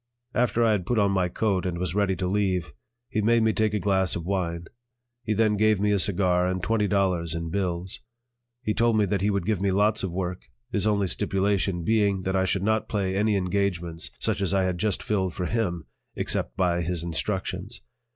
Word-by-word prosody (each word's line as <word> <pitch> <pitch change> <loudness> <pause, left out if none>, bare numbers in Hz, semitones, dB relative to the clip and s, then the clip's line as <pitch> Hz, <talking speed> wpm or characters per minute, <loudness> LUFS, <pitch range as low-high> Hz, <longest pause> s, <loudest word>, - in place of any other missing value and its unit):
After 120 -1 +2
I 115 - +4
had 95 -4 -1
put 120 - +1
on 100 -2 +3
my 95 -2 +1
coat 95 -1 0
and 90 -2 -2
was 90 -1 -2
ready 100 -2 +1
to 90 - -3
leave, 90 -6 0 0.3
he 110 - -1
made 115 +2 +3
me 110 0 +3
take 110 -1 +1
a - - +1
glass 95 -2 +1
of 85 - -4
wine; 85 -3 -2 0.6
he 110 - -1
then 110 0 +3
gave 110 -1 +3
me 105 +1 +2
a 100 - +3
cigar 90 -2 +2
and 90 -1 -2
twenty 110 -1 +1
dollars 90 -5 0
in 85 0 -4
bills. 90 -2 -2 0.6
He 110 - 0
told 115 0 +2
me 105 - +3
that 100 0 -1
he 100 - +2
would 100 -1 -1
give 105 -4 0
me 100 - +2
lots 105 +3 +2
of 95 - -2
work, 90 0 -4 0.2
his 105 0 0
only 100 -2 +2
stipulation 95 -1 0
being 100 -1 +2
that 95 +1 -1
I 95 0 +2
should 95 0 0
not 110 +1 0
play 95 -3 -1
any 105 +1 +2
engagements 90 -3 -1
such - - -1
as 100 0 +1
I 95 - +3
had 90 -2 -1
just 105 -1 -1
filled 95 -4 -1
for 90 - -2
him, 90 -7 -1 0.3
except - - -3
by 90 -2 +1
his 85 0 -2
instructions. 95 +4 -3
95 Hz, 215 wpm, -26 LUFS, 90-105 Hz, 0.6 s, I